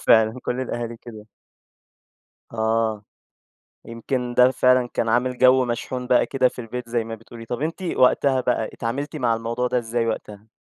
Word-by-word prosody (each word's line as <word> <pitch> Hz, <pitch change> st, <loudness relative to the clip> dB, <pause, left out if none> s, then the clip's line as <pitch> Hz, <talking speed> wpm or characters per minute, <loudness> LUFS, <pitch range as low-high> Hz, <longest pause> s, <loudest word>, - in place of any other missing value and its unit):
فعلًا 110 Hz, +2 st, +4 dB
كل 125 Hz, -, -2 dB
الأهالي 120 Hz, -2 st, -4 dB
كده. 110 Hz, -2 st, -12 dB, 1.3 s
آه. 110 Hz, -1 st, 0 dB, 0.8 s
يمكن 120 Hz, +2 st, -4 dB
ده 125 Hz, +1 st, +6 dB
فعلًا 125 Hz, -1 st, +3 dB
كان 115 Hz, -, 0 dB
عامل 125 Hz, +2 st, +1 dB
جو 130 Hz, 0 st, +5 dB
مشحون 125 Hz, +1 st, -4 dB
بقى 125 Hz, -1 st, +3 dB
كده 130 Hz, -2 st, +2 dB
في 125 Hz, -, -9 dB
البيت 120 Hz, +1 st, -6 dB
زي 115 Hz, -1 st, -1 dB
ما 115 Hz, 0 st, -6 dB
بتقولي. 115 Hz, +1 st, -12 dB
طَب 120 Hz, +2 st, -4 dB
أنتِ 165 Hz, +4 st, -3 dB
وقتها 135 Hz, -4 st, +3 dB
بقى 125 Hz, -3 st, 0 dB
اتعاملتِ 140 Hz, +7 st, -4 dB
مع 120 Hz, -5 st, +1 dB
الموضوع 115 Hz, +2 st, -2 dB
ده 125 Hz, 0 st, +1 dB
إزاي 115 Hz, 0 st, -2 dB
وقتها؟ 105 Hz, -1 st, -5 dB
120 Hz, 165 wpm, -23 LUFS, 115-125 Hz, 1.3 s, ده